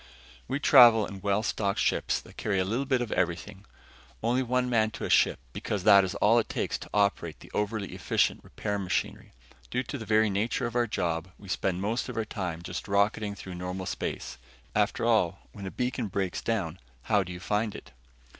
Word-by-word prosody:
We 135 +3 -1
travel 120 -7 +7
in 100 -2 -8
well 100 +1 +1
stocked 100 -3 -1
ships - - +1
that - - -16
carry 100 -2 -1
a 95 - +2
little 120 +8 -1
bit 130 -2 +2
of 115 - -7
everything; 90 +3 -2 0.6
only 120 +3 +2
one 125 0 0
man 110 -3 +2
to - - -4
a - - -2
ship - - +4
because 100 -3 -3
that 100 -1 +7
is 95 - -3
all 115 +3 +4
it 115 - -2
takes - - -2
to - - -10
operate 100 -1 0
the - - -14
overly 105 -1 -1
efficient - - 0
repair 105 -1 -3
machinery. 90 -2 -3 0.4
Due 125 +1 -1
to 140 +1 -6
the 110 - -6
very 110 -1 +3
nature 110 +6 0
of 120 0 -4
our 120 -1 +2
job, 85 -5 -1
we 100 - -14
spend 95 0 -1
most 115 +6 -1
of 125 - -6
our 110 - 0
time 90 -6 -4
just - - -5
rocketing 100 +1 +1
through 95 -2 -8
normal 90 +1 -4
space. - - -4 0.4
After - - +1
all, 100 -6 +1
when 100 -2 -8
a - - -3
beacon 125 +1 -2
breaks 95 -2 -2
down, 95 -7 -2 0.2
how 105 +6 +3
do 90 -1 -5
you 90 - -7
find 105 +2 -1
it? - - -10
105 Hz, 205 wpm, -28 LUFS, 95-115 Hz, 0.6 s, travel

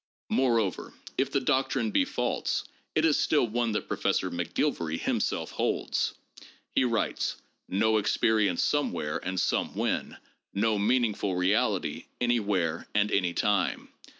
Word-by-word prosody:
Moreover, 115 -7 +1 0.2
if 135 - +1
the 140 - +2
doctrine 130 -4 +1
be - - +3
false, - - -1 0.3
it 155 - +3
is 155 -3 +3
still 150 - +3
one 115 0 -1
that 105 - -2
Professor - - 0
McGilvary 80 -1 -1
himself - - -1
holds. - - -1 0.6
He - - +3
writes: 115 -3 0 0.3
"No 110 +3 +3
experience 105 -3 +2
somewhere 90 - 0
and 95 0 -3
somewhen, - - -1 0.4
no 105 +1 +2
meaningful 105 -3 +1
reality 90 +1 +1
anywhere 100 -9 0
and 105 0 +2
anytime. 95 0 +1
110 Hz, 120 wpm, -28 LUFS, 95-120 Hz, 0.6 s, be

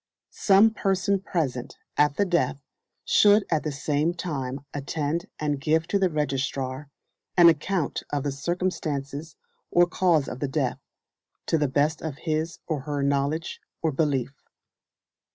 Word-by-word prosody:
Some 205 +2 +6
person 195 -2 +1
present 145 -11 -3 0.2
at 150 -1 +3
the 205 - +3
death 140 -6 0 0.4
should 205 0 +5
at 155 -2 +2
the 155 - -3
same 150 +4 0
time 140 -6 -4
attend 145 +3 -2
and 145 -2 -2
give 160 +3 +2
to 200 - +2
the 190 -1 +3
registrar 135 -2 -2 0.5
an 170 -1 +9
account 165 0 0
of 145 -2 -1
the 145 - -1
circumstances 150 -2 -3 0.3
or 175 0 +5
cause 175 -5 +2
of 125 - -6
the 145 - -1
death, 135 - -1 0.7
to 165 - +1
the 150 - +2
best 145 +4 +1
of 155 -4 -5
his 160 +1 -2
or 155 -3 -2
her 145 0 -3
knowledge 140 +4 -1 0.2
or 160 - +2
belief. 135 -3 0
150 Hz, 145 wpm, -26 LUFS, 140-170 Hz, 0.7 s, an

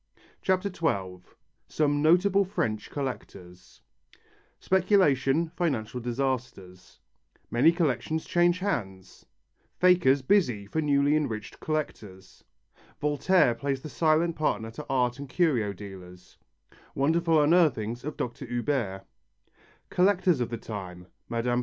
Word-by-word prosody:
CHAPTER 190 +1 0
XII 95 - -2 0.5
SOME 145 -1 0
NOTABLE 180 +5 +4
FRENCH 110 - -3
COLLECTORS 95 -10 -8 0.8
Speculation, 170 -6 +2
financial 125 -8 -2
disasters 120 -7 -4 0.5
Many 135 +8 +5
collections 160 -1 -1
change 175 0 +2
hands 100 - -5 0.5
Fakers 175 -7 +4
busy 130 - +2
for 160 +11 -2
newly 145 0 +2
enriched 115 -9 -3
collectors 105 -11 -5 0.6
Voltaire 150 -1 +2
plays 135 +2 -3
the 155 - -6
silent 160 +2 +1
partner 115 -7 -1
to 135 +7 -8
art 125 -1 0
and 140 -1 -8
curio 130 - +1
dealers 90 -2 -12 0.6
Wonderful 160 +3 +2
unearthings 145 -8 +2
of 150 +2 -6
Dr. 125 +2 -5
Huber 120 -6 -2 0.9
Collectors 180 -4 +2
of 120 - -1
the 120 - -4
time: 95 -5 -8 0.2
Mme. 120 +1 0
135 Hz, 110 wpm, -27 LUFS, 110-165 Hz, 0.9 s, Many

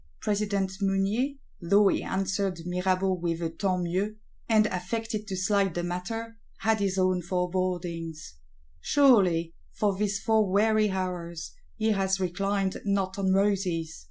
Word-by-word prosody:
President 200 -2 -1
Mounier, 200 +8 +1 0.3
though 200 +4 +4
he - - 0
answered 190 -2 -1
Mirabeau 185 +1 +1
with 170 -2 -2
a 165 -1 -2
tant 185 -1 -1
mieux, 190 +5 -1 0.3
and 215 -1 +5
affected 215 +3 -3
to 195 - -3
slight 195 -1 +1
the 175 - -1
matter, 225 +6 -4 0.2
had 220 0 +2
his 195 -1 0
own 185 -1 +2
forebodings. 175 - -3 0.4
Surely, 190 - +4 0.2
for 205 -2 0
these 205 0 -1
four 220 -1 +2
weary 215 +2 +3
hours, 180 -3 -4 0.2
he 220 0 +1
has 195 -1 +1
reclined 195 +2 -1
not 200 -1 -1
on 190 -1 +2
roses! 190 -5 0
190 Hz, 135 wpm, -27 LUFS, 180-205 Hz, 0.4 s, and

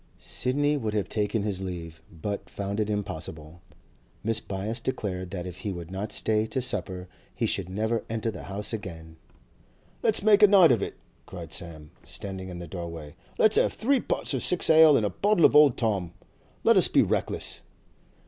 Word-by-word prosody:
Sidney 145 +4 0
would 110 -5 -3
have 105 - 0
taken 105 0 -1
his 100 -3 -2
leave, 85 -4 -6
but 100 +5 -5
found 100 +1 -4
it 105 -1 0
impossible. 80 -5 -5 0.6
Mrs. 115 0 0
Byass 105 +4 -4
declared 95 -7 -3
that 90 -2 -5
if 90 -1 -7
he 105 - -4
would 85 -1 -7
not 100 +3 -4
stay 110 0 0
to 130 - -2
supper 95 -6 -3 0.3
he - - -1
should 90 -2 -1
never 110 +4 -1
enter 115 0 -2
the - - -9
house 100 +3 -2
again. 80 -6 -7 0.8
'Let's 220 -2 +2
make 210 0 +5
a 210 - +9
night 190 -6 +7
of 115 -5 +2
it!' - - -4 0.3
cried 85 -4 -8
Sam, 80 -4 -6
standing 95 -1 -6
in 90 - -7
the 85 - -7
doorway. 85 -4 -7 0.2
'Let's 220 0 +4
have - - +3
three 270 +4 +1
pots - - -1
of - - -1
six 180 -2 +2
ale 160 -2 +7
and 110 - +1
a 105 - -1
bottle 205 -4 +3
of - - +4
old 150 -4 +6
Tom! 100 -7 -1 0.5
Let - - +5
us - - +7
be - - +4
reckless! - - -2
100 Hz, 185 wpm, -27 LUFS, 90-115 Hz, 0.8 s, a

